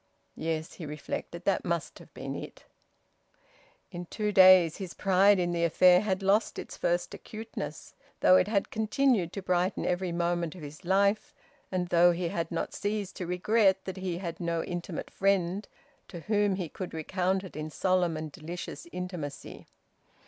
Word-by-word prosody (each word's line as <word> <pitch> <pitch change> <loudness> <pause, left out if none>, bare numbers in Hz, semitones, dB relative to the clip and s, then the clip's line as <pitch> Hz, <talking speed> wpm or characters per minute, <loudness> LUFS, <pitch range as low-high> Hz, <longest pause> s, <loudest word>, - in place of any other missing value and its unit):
"Yes," 160 -1 -3
he 165 - -8
reflected, 150 +3 -6
"that 195 -3 +1
must 170 -2 -3
have - - -15
been - - -5
it." - - -8 1.3
In 175 -1 -7
two 210 +2 -2
days 185 -4 +7
his 190 -4 -7
pride 195 +1 +4
in 175 -1 0
the 170 -1 0
affair 180 +2 +5
had 195 -2 -1
lost 200 +3 +2
its - - -7
first - - -1
acuteness, 220 0 -7 0.3
though 185 - +7
it 185 - +4
had 205 -2 0
continued 220 - +1
to 195 - -5
brighten 180 +1 0
every 180 0 -1
moment 170 -1 -1
of 175 - -10
his 150 +4 -10
life, 200 +3 +1 0.4
and 180 -2 -1
though 175 0 +5
he 170 0 -2
had 170 0 -2
not - - -3
ceased 205 -1 -3
to 180 - -4
regret 190 +1 +2
that 190 0 -5
he 185 -2 -3
had 170 -2 -5
no 170 -1 -1
intimate 175 -1 -5
friend 195 0 +1 0.4
to 170 - -8
whom 205 0 +1
he 185 -3 -3
could 180 +2 -7
recount 185 +4 -1
it 190 - -10
in 155 +1 -4
solemn 180 0 +1
and 155 -1 -5
delicious 175 - -7
intimacy. 180 -6 -6
180 Hz, 170 wpm, -29 LUFS, 170-195 Hz, 1.3 s, days